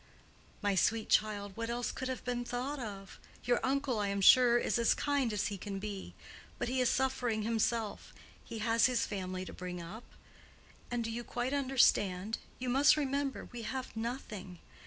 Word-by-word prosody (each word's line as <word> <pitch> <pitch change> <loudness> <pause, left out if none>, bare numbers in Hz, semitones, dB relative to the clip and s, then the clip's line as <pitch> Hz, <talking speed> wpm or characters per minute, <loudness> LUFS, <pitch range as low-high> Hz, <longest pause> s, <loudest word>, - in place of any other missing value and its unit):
"My 205 -1 +2
sweet 215 +4 +1
child, 205 -2 +1
what 230 0 -3
else 240 0 -1
could 260 - -4
have 260 -1 -4
been 245 -1 -1
thought 250 +4 -3
of? 200 -5 -7 0.2
Your 245 0 +2
uncle, 270 -3 0
I 205 - 0
am 200 0 -1
sure, 240 +4 +7
is 240 - +1
as 235 - +4
kind 280 -5 +1
as 210 -1 0
he 200 -2 -5
can 195 0 -5
be: 200 -1 -6 0.4
but 245 - -2
he 255 +1 +1
is 250 - +3
suffering 250 -4 0
himself; 225 -1 -1 0.3
he 230 - -7
has 230 0 +4
his 250 -2 +1
family 185 -2 -4
to - - -8
bring 180 -1 -6
up. 190 +8 -8 0.8
And 240 -1 -1
do 225 - -3
you 240 +1 -4
quite 245 +3 -2
understand? 225 -7 +2 0.2
You 255 - -5
must 270 +5 +5
remember—we 275 -4 -2
have 255 +3 -5
nothing. 220 -6 -5
230 Hz, 180 wpm, -33 LUFS, 205-255 Hz, 0.8 s, sure